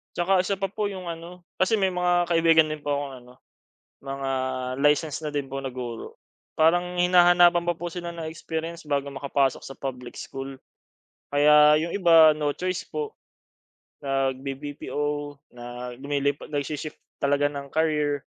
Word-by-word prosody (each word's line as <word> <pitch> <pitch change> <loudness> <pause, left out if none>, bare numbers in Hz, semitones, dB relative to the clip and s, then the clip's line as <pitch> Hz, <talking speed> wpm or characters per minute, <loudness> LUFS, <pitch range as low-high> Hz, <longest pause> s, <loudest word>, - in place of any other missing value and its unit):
Tsaka 185 +2 +2
isa 200 - -1
pa 195 0 -3
po 210 0 -1
'yong 185 -3 -7
ano, 170 +2 -8 0.2
kasi 185 +4 +3
may 190 -3 +1
mga 175 -1 +1
kaibigan 165 -2 +4
din 155 0 -4
po 145 0 -2
akong 140 -1 -4
ano, 125 - -16 0.7
mga 135 0 -4 0.5
licensed 150 +1 +2
na - - -2
din 145 -2 -2
po 135 +1 -4
na 135 - -4
guro. 120 -2 -7 0.4
Parang 175 +3 +2
hinahanapan 175 -1 +5
pa 175 - +1
po 175 +1 -4
sila 170 0 -6
ng 165 -2 -6
experience 165 +1 -5
bago 140 -1 -1
makapasok 135 -1 0
sa 135 - -8
public 125 -3 -6
school. 135 0 -7 0.8
Kaya 150 +1 +6
'yong 170 +1 -3
iba 165 -4 +7
no 145 -1 0
choice 185 0 -3
po, 445 -1 -4 0.9
nag-bi-BPO 140 +2 -3 0.2
na 120 +1 -7
lumilipat, 140 0 -1
nag-shi-shift 150 +1 -4 0.2
talaga 145 +1 +2
ng 140 -1 -6
career. 150 -3 0
150 Hz, 150 wpm, -25 LUFS, 140-175 Hz, 0.9 s, iba